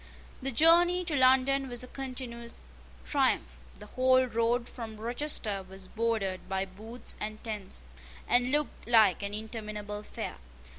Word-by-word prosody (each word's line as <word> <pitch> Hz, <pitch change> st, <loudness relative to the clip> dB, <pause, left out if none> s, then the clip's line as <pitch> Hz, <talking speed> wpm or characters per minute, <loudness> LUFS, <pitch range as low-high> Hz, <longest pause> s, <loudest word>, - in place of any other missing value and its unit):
The 270 Hz, -, -2 dB
journey 345 Hz, +6 st, +5 dB
to 320 Hz, -, -1 dB
London 265 Hz, +1 st, +4 dB
was 245 Hz, 0 st, -3 dB
a -, -, -8 dB
continued 250 Hz, -3 st, -6 dB, 0.5 s
triumph. 65 Hz, 0 st, +1 dB, 0.2 s
The -, -, -11 dB
whole 255 Hz, +3 st, +3 dB
road 235 Hz, +1 st, 0 dB
from 225 Hz, -3 st, -8 dB
Rochester 230 Hz, -3 st, 0 dB
was 190 Hz, 0 st, -7 dB
bordered 220 Hz, -4 st, -2 dB
by 190 Hz, 0 st, 0 dB
booths 215 Hz, +6 st, -8 dB
and 215 Hz, 0 st, -5 dB
tents, 210 Hz, -, -6 dB, 0.4 s
and 245 Hz, +1 st, +3 dB
looked 295 Hz, -2 st, -2 dB
like 215 Hz, -7 st, +5 dB
an 200 Hz, 0 st, -3 dB
interminable 210 Hz, -2 st, -6 dB
fair. 210 Hz, -, -6 dB
230 Hz, 140 wpm, -30 LUFS, 210-255 Hz, 0.5 s, journey